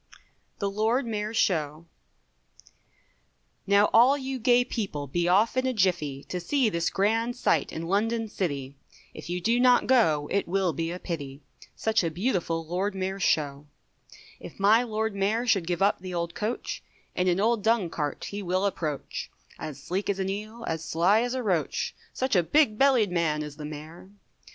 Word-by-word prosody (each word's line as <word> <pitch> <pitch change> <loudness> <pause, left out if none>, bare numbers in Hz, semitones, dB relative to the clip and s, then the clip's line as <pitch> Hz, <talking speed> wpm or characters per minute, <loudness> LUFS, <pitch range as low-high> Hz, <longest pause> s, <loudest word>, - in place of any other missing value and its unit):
THE 200 - -1
LORD 220 +6 +1
MAYOR'S 215 0 -3
SHOW. 155 -4 0 1.8
Now 200 +1 +5
all 250 +5 +6
you 265 -1 -4
gay 245 +1 +4
people, 195 -13 -3
be 170 +6 -1
off 205 +7 +3
in 260 0 +1
a 260 - 0
jiffy, 170 - 0
To 180 - -5
see 250 +7 +1
this 170 -3 0
grand 225 +5 0
sight 250 - +1
in 160 - -5
London 225 +5 0
city, 140 -10 -3 0.4
If - - -10
you 180 +1 -1
do 230 +7 +1
not 250 0 +5
go, 160 - +3
it 200 - 0
will 185 -1 +1
be 165 0 -2
a 175 - -4
pity, 145 -6 -6 0.3
Such 220 -3 +1
a 165 - 0
beautiful 170 -3 -1
Lord 190 +5 -2
Mayor's 190 +1 -3
Show; 145 -3 0 0.7
If - - -11
my 210 +4 +5
Lord 220 -2 -2
Mayor 205 +5 0
should 195 -8 +2
give 175 +1 0
up 200 - +2
the 180 0 -6
old 170 0 -2
coach, 215 +6 -3 0.3
In 180 - 0
an 180 +1 +2
old 225 +1 +2
dung 220 -5 +1
cart 150 -2 -3
he 205 +1 -4
will 185 +1 0
approach, 155 -7 -3 0.3
As 155 -3 -6
sleek 190 +4 -2
as 200 - 0
an 190 0 -2
eel, 215 +4 -6
as 160 0 -2
sly 180 +7 +3
as 245 +1 -2
a 255 - -2
roach, 180 -7 -1 0.2
Such 260 -3 -1
a 180 - +5
big 230 - +3
bellied 255 -8 +4
man 160 -3 0
is 150 -1 -8
the 150 - -7
mayor. 155 +4 -9
195 Hz, 180 wpm, -27 LUFS, 165-225 Hz, 1.8 s, all